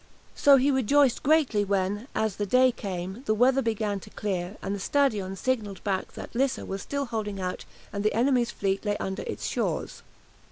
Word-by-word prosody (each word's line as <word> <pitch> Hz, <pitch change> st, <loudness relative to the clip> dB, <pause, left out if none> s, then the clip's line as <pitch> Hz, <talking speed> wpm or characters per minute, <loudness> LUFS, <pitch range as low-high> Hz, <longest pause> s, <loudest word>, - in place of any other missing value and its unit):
So 285 Hz, -1 st, +6 dB
he 270 Hz, +2 st, +3 dB
rejoiced 265 Hz, 0 st, +3 dB
greatly 280 Hz, -8 st, +3 dB
when, 200 Hz, +3 st, -1 dB
as 220 Hz, -3 st, 0 dB
the 205 Hz, -, -2 dB
day 255 Hz, +4 st, +5 dB
came, 190 Hz, -1 st, -5 dB
the 215 Hz, -, +3 dB
weather 255 Hz, +4 st, +4 dB
began 215 Hz, -4 st, -1 dB
to 210 Hz, -, -13 dB
clear, 195 Hz, -2 st, -3 dB
and 195 Hz, -, -2 dB
the 200 Hz, -, -3 dB
"Stadion" 210 Hz, -6 st, +1 dB
signalled 210 Hz, -3 st, -2 dB
back 195 Hz, -2 st, -2 dB
that -, -, -9 dB
Lissa 265 Hz, +2 st, 0 dB
was 195 Hz, 0 st, -4 dB
still 280 Hz, 0 st, -3 dB
holding 215 Hz, -4 st, -4 dB
out 180 Hz, -1 st, -4 dB, 0.3 s
and 200 Hz, 0 st, -2 dB
the 215 Hz, -, +1 dB
enemy's 245 Hz, 0 st, +2 dB
fleet 195 Hz, -1 st, -1 dB
lay 205 Hz, -1 st, 0 dB
under 190 Hz, +1 st, -3 dB
its -, -, -4 dB
shores. -, -, -2 dB
215 Hz, 190 wpm, -27 LUFS, 195-255 Hz, 0.3 s, So